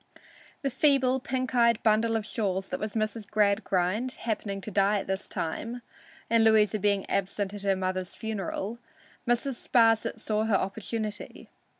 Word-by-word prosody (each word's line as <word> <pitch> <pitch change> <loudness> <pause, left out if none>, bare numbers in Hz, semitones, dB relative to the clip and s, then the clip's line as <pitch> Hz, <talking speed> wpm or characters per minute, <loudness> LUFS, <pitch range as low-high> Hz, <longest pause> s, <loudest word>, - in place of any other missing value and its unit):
The 275 - 0
feeble, 265 -1 +3
pink 255 0 -3
eyed 235 -2 +3
bundle 225 +1 +3
of 220 -2 -1
shawls 195 -3 -2
that - - -2
was 215 0 -4
Mrs. 215 -1 -2
Gradgrind, 205 +2 +1
happening 210 -3 -3
to 215 - -7
die 200 +1 +3
at - - -3
this 190 +1 -3
time, 230 +9 -4 0.4
and 230 0 +4
Louisa 215 -1 +4
being 200 -1 +1
absent 195 +1 -1
at 205 - -6
her 195 -1 +2
mother's 185 -1 -3
funeral, 220 +1 -4 0.5
Mrs. 240 +1 -1
Sparsit 225 -1 +3
saw 215 0 0
her 220 -3 +2
opportunity. 210 +2 -4
215 Hz, 155 wpm, -28 LUFS, 200-230 Hz, 0.5 s, and